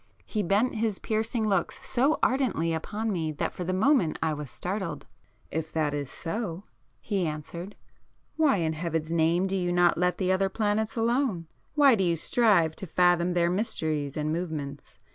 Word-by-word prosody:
He 215 - -2
bent 205 +6 +2
his 220 -3 0
piercing 220 +1 -1
looks 195 -5 -1
so 270 +5 +2
ardently 245 -11 +1
upon 210 +7 -3
me 160 -5 -1
that 145 - -2
for 180 - -5
the 180 - -2
moment 190 - +2
I 160 -1 0
was 150 -2 -6
startled. 180 - -4 0.5
"If 160 0 -3
that 155 -2 0
is 145 -2 -3
so," 180 0 -4 0.4
he 195 -5 -1
answered, 170 +5 -6 0.6
"why 310 -3 +4
in 160 -2 0
Heaven's 160 0 -3
name 170 +2 +2
do 195 0 -1
you 180 -2 0
not 175 -1 +3
let 180 0 +1
the 185 -1 +1
other 195 +1 +2
planets 215 +1 0
alone? 230 -6 0 0.3
Why 285 -3 +6
do 200 -4 +2
you 170 -2 +2
strive 175 -4 +3
to 190 - -5
fathom 175 +1 +3
their 170 0 +2
mysteries 155 -8 -1
and 155 +1 -1
movements? 145 -6 -5
180 Hz, 175 wpm, -27 LUFS, 160-215 Hz, 0.6 s, Why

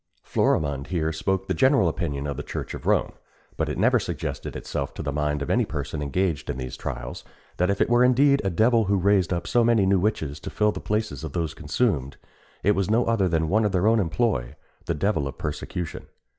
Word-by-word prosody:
Florimond 70 -3 0
here 80 -3 -1
spoke 95 +4 -1
the - - 0
general 130 - +4
opinion 75 -4 -2
of 70 -1 -3
the 75 - -4
Church - - -5
of - - -7
Rome; - - +2 0.4
but - - -1
it - - -3
never - - +4
suggested - - -4
itself 70 -1 -4
to - - -5
the 70 - -2
mind 75 0 -1
of - - -3
any - - +3
person 75 - -4
engaged 80 +2 -1
in - - -2
these 65 -1 -5
trials, 60 -2 -6 0.3
that 90 +1 +2
if 100 - 0
it - - +3
were 120 +1 +4
indeed 140 +3 +4
a 95 - +1
devil 110 +5 +3
who 100 +1 +2
raised 95 -1 +2
up 85 -1 -1
so 120 0 +3
many 115 -4 +4
new 95 0 +3
witches 80 -8 -1
to - - -7
fill 105 0 +2
the - - -7
places 105 -4 -2
of 80 -4 -6
those 85 -3 -2
consumed, 80 - -1 0.5
it 105 - +4
was 95 0 -1
no 115 +3 +3
other 115 -5 +2
than 80 -2 +1
one 110 +7 +2
in 105 - +2
their 95 -1 +1
own 115 +1 +4
employ 80 - 0 0.3
the 85 - -1
devil 80 -3 0
of 70 0 -7
persecution. 80 +2 -5
90 Hz, 225 wpm, -25 LUFS, 75-105 Hz, 0.5 s, general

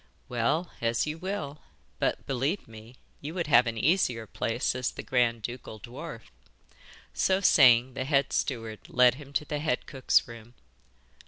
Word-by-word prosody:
'Well, 140 +9 0
as 115 -1 +1
you 155 +1 -5
will; 170 -6 -4 0.4
but - - -1
believe 135 +9 -2
me, 110 +2 -13 0.3
you 155 +4 -6
would 175 -2 -1
have 125 -4 +5
an 115 -1 -3
easier 125 - +1
place 115 +4 -1
as 130 0 -1
the - - -8
grand 120 -3 +1
ducal 120 -2 -7
dwarf.' 120 - -9 0.8
So 190 0 +2
saying, 130 -8 +5
the 130 0 -3
head 140 -1 +1
steward 115 -5 -2
led 125 -1 +5
him 140 -1 -12
to 150 - 0
the 150 0 -3
head 145 -5 -1
cook's 135 -2 +2
room. 115 0 -12
125 Hz, 160 wpm, -28 LUFS, 115-150 Hz, 0.8 s, have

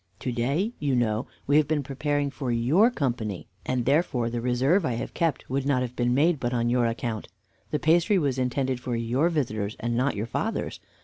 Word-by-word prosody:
To 125 - -2
day, 140 - 0
you 140 -3 +1
know, 110 -2 0 0.2
we 145 +2 +4
have 155 -2 +4
been 150 -2 0
preparing 145 +1 -1
for 130 -3 -3
your 135 - +4
company, 120 - -2 0.2
and 125 -2 0
therefore 135 -5 +1
the 120 0 -2
reserve 130 +10 +2
I 125 - 0
have 115 - -4
kept 165 -5 -1
would 135 +1 -1
not 130 -3 +2
have 125 0 -5
been 120 0 +1
made 155 +2 +3
but 120 0 -1
on 120 0 +1
your 120 -1 +3
account. 115 -2 -3 0.4
The 150 - 0
pastry 170 +7 +3
was 140 -6 0
intended 130 0 0
for 125 -1 -3
your 120 +8 +1
visitors, 110 -10 -2
and 120 0 -1
not 130 +2 +1
your 105 +2 -2
father's. 115 - -3
130 Hz, 205 wpm, -26 LUFS, 120-145 Hz, 0.4 s, we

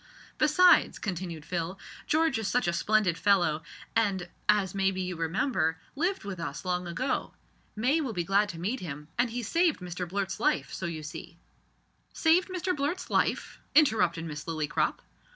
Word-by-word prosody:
"Besides," 350 +4 +5
continued 175 -5 -5
Phil, 175 +2 -3 0.3
"George 315 -5 +2
is 220 - -2
such 250 -3 +1
a 170 - +1
splendid 205 -3 +2
fellow, 175 -6 +3 0.3
and, 195 -5 +1 0.2
as 205 -3 +3
maybe 195 -1 +1
you 180 -1 -2
remember, 165 - 0 0.2
lived 350 - 0
with 195 -3 -6
us 165 +1 -5
long 180 0 -1
ago. 250 +10 -2 0.4
May 260 +9 +2
will 265 -6 -2
be 180 -5 -2
glad 200 +3 +2
to 165 - -7
meet 215 +10 -2
him; 150 -3 -7
and 245 0 +3
he 240 +1 -4
saved 335 +7 +2
Mr 180 -1 -5
Blurt's 195 0 -2
life, 140 -1 +1
so 185 - -3
you 160 -2 -5
see 165 +2 -8 0.4
" - - -41 0.3
"Saved 340 +4 +3
Mr 365 0 -1
Blurt's 295 +6 -2
life!" - - 0 0.2
interrupted 180 - +4
Miss 150 -2 -6
Lillycrop. 155 -1 -1
190 Hz, 170 wpm, -29 LUFS, 170-250 Hz, 0.4 s, Besides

